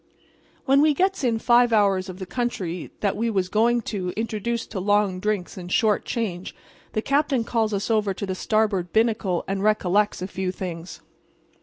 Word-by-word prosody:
"When 275 +1 +5
we 300 -1 +4
gets 380 0 +1
in 235 -3 +2
five 240 +1 +4
hours 200 -3 +2
of 185 - -7
the 190 - -6
country 185 -6 -3
that 200 -2 +1
we 230 +3 0
was 190 -4 0
going 235 +4 +2
to 185 -3 -2
introduce 225 +1 -2
to 200 - -6
long 205 -1 +1
drinks 205 -2 -2
and 175 0 -8
short 215 0 +2
change 190 -6 -3 0.4
the 215 - -1
captain 275 -3 +1
calls 225 -2 0
us 205 +2 -2
over 210 -2 +2
to 195 +1 -4
the 190 - -3
starboard 200 -3 0
binnacle 220 -5 +1
and 195 0 -2
recollects 210 0 +2
a 185 - -4
few 190 -1 -3
things. 180 -2 -7
210 Hz, 180 wpm, -24 LUFS, 185-230 Hz, 0.4 s, When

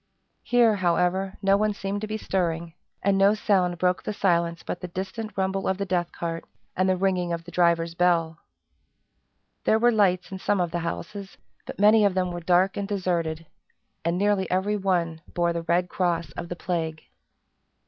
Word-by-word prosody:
Here, 235 -3 +3
however, 185 +2 0
no 195 0 +5
one 210 0 0
seemed 200 +1 -3
to 215 - -3
be 215 0 -3
stirring; 170 -5 -2 0.3
and 195 0 +2
no 200 +2 +5
sound 185 -5 +1
broke 180 +1 +1
the 210 - -4
silence 170 -3 +1
but 175 - -5
the 180 - -4
distant 195 +4 -6
rumble 190 0 -1
of 190 - 0
the 200 - -2
death 175 -2 -1
cart, 165 -1 -4 0.3
and 185 +1 +2
the 185 - +2
ringing 180 -2 0
of 170 0 -3
the 175 - -11
driver's 170 -1 +2
bell. 170 -2 +1 1.2
There 220 - +3
were 240 +2 +4
lights 190 -5 +2
in 190 - -6
some 205 +1 0
of 175 -2 0
the 175 - -1
houses, 190 +4 -6 0.3
but - - -7
many 210 +2 +6
of 200 -2 +2
them 180 -1 0
were 175 - -4
dark 180 +3 +2
and 200 -1 -2
deserted, 170 -5 -2 0.6
and 170 +1 0
nearly 200 -1 +1
every 190 +3 +1
one 175 -5 -1
bore 170 -1 +1
the 170 - -2
red 175 +2 +1
cross 170 -5 -1
of 170 - -7
the 175 - -4
plague. 165 -3 -3
180 Hz, 190 wpm, -25 LUFS, 170-195 Hz, 1.2 s, many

